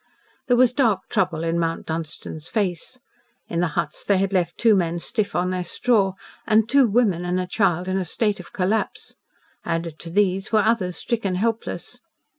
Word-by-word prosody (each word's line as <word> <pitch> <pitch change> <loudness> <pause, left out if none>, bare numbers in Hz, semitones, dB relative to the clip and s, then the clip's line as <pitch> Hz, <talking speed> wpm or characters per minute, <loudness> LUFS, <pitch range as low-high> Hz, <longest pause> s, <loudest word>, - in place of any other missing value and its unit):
There 245 - +4
was 250 0 +5
dark 225 -8 +1
trouble 170 -4 0
in 165 0 0
Mount 165 -1 -2
Dunstan's 160 0 -5
face. 200 +2 -2 0.5
In 170 - -2
the 175 - +2
huts 155 -3 -2
they 200 - +2
had 195 +1 0
left 175 -2 0
two 225 -3 +5
men 170 -2 0
stiff 205 +4 -2
on 180 +1 +1
their 185 -1 -2
straw, 195 +1 +1 0.3
and 220 0 +4
two 275 0 +5
women 205 -6 +2
and 180 +1 -1
a 185 - -1
child 180 -2 +1
in 190 +1 0
a - - -1
state 205 +4 0
of 180 - -11
collapse. 195 +4 -1 0.5
Added 165 -1 -3
to 170 - -8
these 195 +1 +1
were 215 -2 +4
others 205 -5 +1
stricken 210 -6 -1
helpless. 225 +4 -3
185 Hz, 185 wpm, -23 LUFS, 170-215 Hz, 0.5 s, was